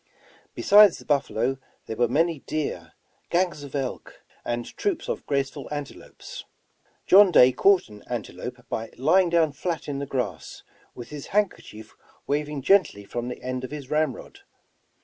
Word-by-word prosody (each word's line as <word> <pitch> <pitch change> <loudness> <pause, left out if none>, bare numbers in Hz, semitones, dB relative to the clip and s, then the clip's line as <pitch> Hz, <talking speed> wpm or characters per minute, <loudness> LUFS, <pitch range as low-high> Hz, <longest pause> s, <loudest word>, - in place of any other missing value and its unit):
Besides 205 -2 +6
the - - -14
buffalo 135 -3 0 0.3
there 110 - -5
were 120 +1 +2
many 160 +5 +1
deer, 90 - -4 0.4
gangs 175 -3 0
of 140 -1 -9
elk, 135 -3 -5 0.2
and 120 0 -3
troops 400 -5 -2
of - - -4
graceful 140 0 -2
antelopes. 145 -2 -8 0.6
John 200 +1 +7
Day 130 -7 +7
caught 195 +7 +3
an 105 -2 -13
antelope - - -6
by 115 0 -4
lying 175 +7 +3
down 165 -3 +3
flat 160 +4 -4
in 140 -1 -3
the 140 - -4
grass, 130 -2 -4 0.3
with 120 - -9
his 150 -2 -8
handkerchief 180 - -2 0.3
waving 145 -1 -2
gently 185 - +3
from 120 +3 -4
the 125 - -7
end 130 0 -3
of 130 - -5
his 145 -3 -8
ramrod. 155 - -2
145 Hz, 150 wpm, -25 LUFS, 125-170 Hz, 0.6 s, John